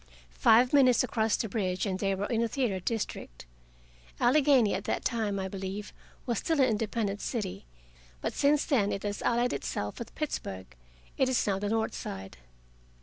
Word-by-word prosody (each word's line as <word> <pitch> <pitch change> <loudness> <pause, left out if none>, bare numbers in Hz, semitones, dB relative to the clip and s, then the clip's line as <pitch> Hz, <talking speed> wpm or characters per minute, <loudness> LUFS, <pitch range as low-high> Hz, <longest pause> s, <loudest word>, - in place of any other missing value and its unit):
Five 245 +4 +5
minutes 255 -4 +5
across 220 -3 +1
the 225 - -2
bridge, 190 -3 -1
and 190 -2 -2
they 195 0 +1
were 195 +2 -2
in 230 +1 0
the 235 - +2
theater 225 -6 -1
district. 185 - -4 0.7
Allegheny 265 -4 +4
at 195 - -3
that - - -2
time, 220 -4 0
I 190 -1 -2
believe, 195 +2 -6 0.3
was 235 -4 0
still 320 -2 0
an 265 - +5
independent 215 -2 -1
city. 200 - -4 0.5
But - - -3
since 285 +1 +3
then 220 - +2
it 195 - -3
has 205 0 -3
allied 240 +1 +1
itself 105 0 -4
with 235 - -8
Pittsburgh; 95 - -5 0.4
it 265 - +3
is 255 - +1
now 195 -2 0
the 205 0 -2
North 225 0 0
Side. 95 0 -7
220 Hz, 175 wpm, -29 LUFS, 195-245 Hz, 0.7 s, Five